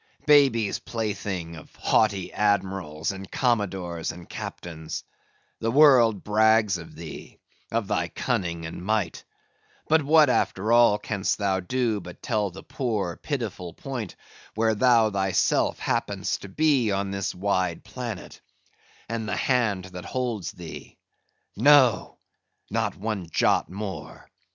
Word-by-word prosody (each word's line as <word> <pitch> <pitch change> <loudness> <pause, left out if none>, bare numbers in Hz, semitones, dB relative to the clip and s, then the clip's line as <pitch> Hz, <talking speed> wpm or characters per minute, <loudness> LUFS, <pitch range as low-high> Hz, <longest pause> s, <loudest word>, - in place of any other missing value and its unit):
babies' 135 -8 +4
plaything 100 -7 -4
of 75 - -13
haughty 100 -4 +1
Admirals, 95 -6 0
and 95 -1 -9
Commodores, 95 -9 -1
and 85 0 -12
Captains; 80 -2 -6 0.6
the 115 - -1
world 120 -7 +5
brags 110 -2 +3
of 80 - -11
thee, 80 -4 -9 0.3
of - - -1
thy - - 0
cunning 85 -3 -2
and 80 +2 -7
might; 105 -4 -1 0.6
but 160 0 +4
what 150 +1 +5
after 110 -4 0
all 120 -3 +6
canst 100 -2 -1
thou 100 -2 0
do, 115 +2 -1
but 90 0 -11
tell 105 -4 0
the 95 +2 -11
poor, 105 -9 -2
pitiful 110 - -4
point, 125 -8 -6 0.4
where 110 0 +2
thou 115 -1 +4
thyself 95 -1 +1
happenest - - -2
to 100 - -9
be 140 -2 +2
on 100 0 -1
this 100 -1 -3
wide 95 -2 -1
planet, - - -7 0.7
and 115 -1 -3
the - - -1
hand 110 -8 +1
that 90 -1 -9
holds 120 -8 -3
thee: 85 -2 -10 0.6
no! 130 +1 +4 0.5
not - - -1
one 100 -4 -4
jot - - +2
more! 100 +1 -7
105 Hz, 130 wpm, -25 LUFS, 95-115 Hz, 0.7 s, all